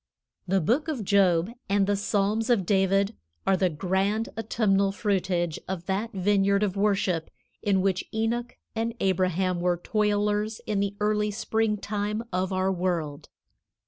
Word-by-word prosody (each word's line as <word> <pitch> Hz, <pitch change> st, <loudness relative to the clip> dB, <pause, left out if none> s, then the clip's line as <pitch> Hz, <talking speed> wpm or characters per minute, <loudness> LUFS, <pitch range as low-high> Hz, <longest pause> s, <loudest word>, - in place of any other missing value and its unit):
The 190 Hz, +1 st, +2 dB
Book 250 Hz, -, +1 dB
of 265 Hz, -10 st, -3 dB
Job 185 Hz, -1 st, +3 dB, 0.2 s
and 200 Hz, 0 st, +3 dB
the 205 Hz, +1 st, +1 dB
Psalms 210 Hz, +3 st, 0 dB
of 220 Hz, -7 st, +3 dB
David 195 Hz, +2 st, +2 dB, 0.3 s
are 195 Hz, -, +4 dB
the 185 Hz, -1 st, +2 dB
grand 195 Hz, +7 st, 0 dB
autumnal 200 Hz, -3 st, +1 dB
fruitage 185 Hz, -5 st, -1 dB
of 180 Hz, -2 st, -4 dB
that 200 Hz, +5 st, -2 dB
vineyard 200 Hz, 0 st, +2 dB
of 200 Hz, -2 st, -1 dB
worship 195 Hz, -5 st, +1 dB, 0.3 s
in 195 Hz, -2 st, +2 dB
which 190 Hz, -1 st, 0 dB
Enoch 230 Hz, +2 st, -2 dB, 0.2 s
and 230 Hz, +1 st, -1 dB
Abraham 185 Hz, -1 st, +1 dB
were 175 Hz, 0 st, +1 dB
toilers 210 Hz, +2 st, 0 dB
in 210 Hz, -2 st, -1 dB
the 200 Hz, 0 st, -1 dB
early 210 Hz, 0 st, +1 dB
springtime 210 Hz, 0 st, -1 dB
of 185 Hz, +1 st, 0 dB
our 190 Hz, 0 st, +1 dB
world. 170 Hz, -6 st, -2 dB
200 Hz, 145 wpm, -26 LUFS, 185-210 Hz, 0.3 s, are